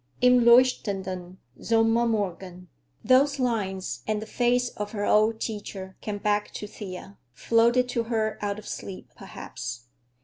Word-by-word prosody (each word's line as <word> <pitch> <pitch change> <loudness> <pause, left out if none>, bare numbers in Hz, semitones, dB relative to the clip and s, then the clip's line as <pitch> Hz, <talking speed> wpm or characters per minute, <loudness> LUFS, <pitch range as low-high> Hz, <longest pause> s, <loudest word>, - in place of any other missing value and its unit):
"Im 250 -1 +5
leuchtenden 195 -7 +2 0.2
Sommermorgen"; 215 -6 0 0.3
those 270 +5 +4
lines, 205 -7 -2
and 215 -1 0
the 215 - -6
face 245 +2 +1
of 210 -1 -6
her 205 -1 -2
old 220 +1 +3
teacher, 200 -4 -6
came 210 -1 -4
back 205 0 0
to - - -5
Thea, 200 -1 -9
floated 235 - +3
to 235 -2 -1
her 220 -2 -1
out 205 0 -2
of 210 - -10
sleep, 190 -2 -7
perhaps. 120 -1 -7
215 Hz, 135 wpm, -26 LUFS, 195-235 Hz, 0.3 s, Im